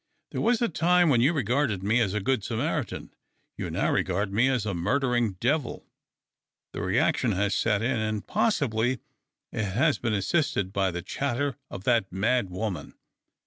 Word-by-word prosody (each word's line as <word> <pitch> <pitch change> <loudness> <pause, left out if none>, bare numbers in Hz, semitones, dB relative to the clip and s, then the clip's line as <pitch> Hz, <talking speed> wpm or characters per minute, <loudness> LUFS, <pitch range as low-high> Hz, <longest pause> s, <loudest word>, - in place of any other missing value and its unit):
There - - -3
was 240 0 +2
a - - +3
time 175 0 +3
when 125 -5 +4
you 135 +6 +4
regarded 125 - 0
me 110 +5 +2
as 105 -4 +1
a - - +1
good 120 +1 0
Samaritan; 135 +4 -3 0.4
you - - -4
now - - 0
regard 95 +2 0
me 120 +6 +3
as 125 -5 0
a 100 - -1
murdering 120 +4 +1
devil. 125 - -1 0.9
The - - -4
reaction - - +1
has 100 +2 0
set 105 -1 +1
in, 120 -1 +1
and, 110 -1 -2
possibly, 125 - +1 0.5
it 110 - -2
has 120 +7 +1
been 120 -3 -1
assisted 100 - 0
by 95 -1 +1
the 85 -1 -5
chatter 140 +5 -2
of 95 - -8
that 115 -4 +2
mad 110 +3 +1
woman. 90 -4 -4
115 Hz, 170 wpm, -27 LUFS, 100-135 Hz, 0.9 s, when